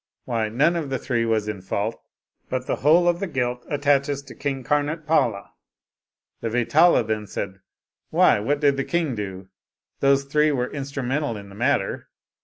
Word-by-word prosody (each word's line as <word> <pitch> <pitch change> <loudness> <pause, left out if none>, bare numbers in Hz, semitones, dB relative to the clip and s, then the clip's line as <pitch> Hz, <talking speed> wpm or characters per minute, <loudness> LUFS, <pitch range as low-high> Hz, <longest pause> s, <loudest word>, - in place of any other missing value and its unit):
Why, 115 -3 -1
none 145 +10 +2
of 160 -5 -2
the 135 - -1
three 120 -2 -1
was 110 -2 0
in 105 -3 -4
fault, 100 +4 -3 0.5
but 130 0 -2
the - - -1
whole 165 +5 +4
of 175 0 +2
the 195 - -2
guilt 125 -5 -2
attaches 140 -1 +1
to 140 - -12
King 135 -2 -3
Kamotpala." 150 -6 0 0.9
The 115 - -3
Vetala 125 +7 +4
then 110 -1 -3
said, 95 0 -5 0.5
"Why, - - +4
what 140 +8 0
did 140 -2 +3
the 135 - 0
king 165 -4 -1
do? 95 -3 -6 0.5
Those 140 0 +3
three 150 +2 +2
were 125 -3 0
in 140 +1 -5
strumental 135 -3 -2
in 100 0 -12
the 100 - -13
matter. 120 -2 0
135 Hz, 175 wpm, -23 LUFS, 110-145 Hz, 0.9 s, whole